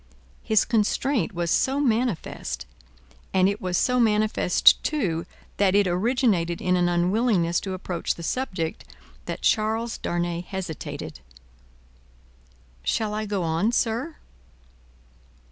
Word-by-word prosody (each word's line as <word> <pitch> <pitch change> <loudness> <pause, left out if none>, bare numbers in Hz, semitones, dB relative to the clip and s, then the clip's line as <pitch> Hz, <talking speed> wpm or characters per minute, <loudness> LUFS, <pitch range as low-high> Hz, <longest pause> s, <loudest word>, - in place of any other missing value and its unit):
His 220 -2 +2
constraint 225 - +1
was 170 -3 -2
so 270 +2 +2
manifest, 240 - -1 0.7
and 185 0 +5
it 200 +1 -2
was 180 -1 -1
so 250 +6 +2
manifest, 215 -5 +4
too, 175 - -1 0.3
that 200 -1 +3
it 205 0 +5
originated 185 -2 +1
in 180 0 +1
an 175 -1 +2
unwillingness 175 0 +2
to 190 -2 -4
approach 180 -2 -3
the 170 - -9
subject, 180 -7 -3 0.4
that - - -5
Charles 220 +2 +1
Darnay 175 0 -2
hesitated. 180 - -6 1.6
"Shall 215 -2 0
I 215 0 -3
go 200 -3 -1
on, 165 +7 +1
sir?" 240 +7 -1
200 Hz, 115 wpm, -25 LUFS, 175-225 Hz, 1.6 s, and